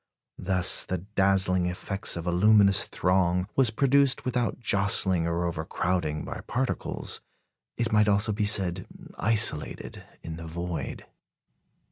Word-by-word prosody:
Thus 95 -1 +3
the 95 - -3
dazzling 95 -1 +1
effect 95 +2 -1
of 85 - -6
a 90 - -1
luminous 100 +1 +4
throng 90 0 0
was 130 -4 +3
produced 135 +3 +2
without 125 -2 -1
jostling 100 -6 +1
or 85 +1 -2
overcrowding, 85 -1 -3
by - - -7
particles, 130 +2 -3 0.6
it 115 -1 -2
might 105 0 +3
almost 105 +1 +3
be 105 0 -1
said, 95 -3 +1 0.3
isolated 105 -8 -1 0.2
in 80 -1 -7
the 85 0 -9
void. 85 -3 -6
95 Hz, 125 wpm, -26 LUFS, 85-105 Hz, 0.6 s, luminous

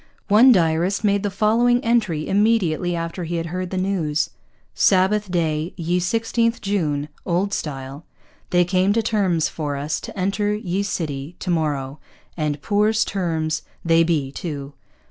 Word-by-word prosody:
One 225 +6 +7
diarist 175 +1 +2
made 200 -1 +2
the 205 - -1
following 225 +5 +3
entry 210 -10 +1
immediately 190 -5 +2
after 165 +2 -4
he 170 +1 -3
had 165 0 -2
heard 180 +2 -4
the 185 - -4
news: 180 -5 0 0.4
'Sabbath 195 +2 +3
Day, 160 -2 -1
ye 175 +1 0
16th 230 +5 0
June 155 -8 -1 0.2
[Old 190 +3 0
Style] 135 -2 -5 0.5
they 175 0 +3
came 185 +2 +2
to 225 +1 +1
Termes 190 -8 +1
for 145 -3 -4
us 150 +2 -2
to - - -8
enter 205 +2 0
ye 195 -3 -2
Sitty 155 -5 -4
to 180 - -3
morrow, 145 -4 -1 0.4
and 150 -3 -2
Poore 210 +1 +2
Termes 160 -4 -1 0.2
they 165 0 +5
Bee 155 -5 0
too.' 145 -2 -6
175 Hz, 150 wpm, -22 LUFS, 155-200 Hz, 0.5 s, One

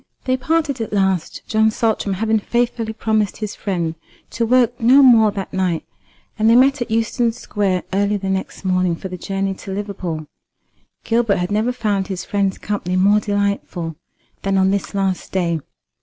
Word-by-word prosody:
They 255 - +2
parted 285 -1 0
at 225 - -4
last, 190 -4 0
John 220 0 +3
Saltram 220 -3 0
having 220 +2 +1
faithfully 235 0 -1
promised 220 -2 0
his 215 -2 -4
friend 175 -6 -2 0.4
to 230 -1 -1
work 245 0 +3
no 260 +5 +6
more 230 -4 +7
that 195 -2 -5
night, 185 -3 -1 0.5
and 220 +1 +4
they 230 - +6
met 270 +2 +4
at 240 - -2
Euston 230 +1 +1
Square 195 -5 -1
early 200 +1 +1
the 195 -1 -5
next 190 0 -4
morning 185 -2 +1
for 190 - -7
the 180 - -5
journey 195 +1 -2
to 190 +1 -9
Liverpool. 190 -6 -4 0.8
Gilbert 230 -3 +2
had 180 +1 -2
never 215 +4 +1
found 210 -6 -1
his 190 -2 -5
friend's 200 -2 0
company 195 -3 -3
more 200 +3 +4
delightful 200 -5 -2 0.5
than 195 0 0
on 190 0 +3
this 200 0 -2
last 195 -2 -1
day. 170 -3 0
205 Hz, 170 wpm, -20 LUFS, 190-225 Hz, 0.8 s, more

